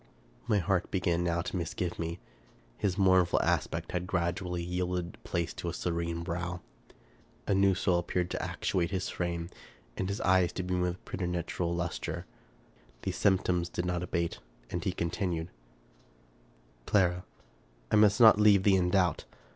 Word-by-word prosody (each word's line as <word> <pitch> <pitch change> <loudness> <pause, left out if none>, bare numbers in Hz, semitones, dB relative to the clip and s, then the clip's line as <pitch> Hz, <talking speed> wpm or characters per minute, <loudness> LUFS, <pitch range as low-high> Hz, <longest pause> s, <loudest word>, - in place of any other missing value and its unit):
My 110 -3 +3
heart 95 -1 0
began 85 -2 0
now 85 -1 0
to - - -5
misgive 90 +1 -3
me. 85 0 -3 0.6
His 95 -2 -1
mournful 95 -3 +4
aspect 80 0 -1
had 90 0 -2
gradually 90 0 -1
yielded 90 0 -3
place 85 -2 -2
to 85 - -4
a - - -5
serene 85 -1 -2
brow. 90 +1 -3 0.8
A - - +1
new 95 0 +4
soul 90 -2 +2
appeared 90 0 -2
to - - -2
actuate 85 -2 -1
his 95 -1 -2
frame, 85 -1 -3 0.5
and 95 - -2
his 100 - -2
eyes 95 -2 +3
to 90 - -3
beam 90 0 -1
with 90 0 -2
preternatural 90 -1 -2
luster. 85 0 -3 0.8
These - - -2
symptoms 90 -3 +2
did 90 - -3
not 90 -1 -1
abate, 85 -1 -2 0.3
and 85 - -2
he 95 - 0
continued: 85 -1 -2 0.7
— - - -32
" - - -32
Clara, 90 -3 +2 0.7
I - - +4
must 105 +1 +5
not 110 -3 +8
leave 105 -2 +6
thee 95 -1 +5
in 90 -1 +1
doubt. 90 -8 +2
90 Hz, 160 wpm, -30 LUFS, 85-95 Hz, 0.8 s, not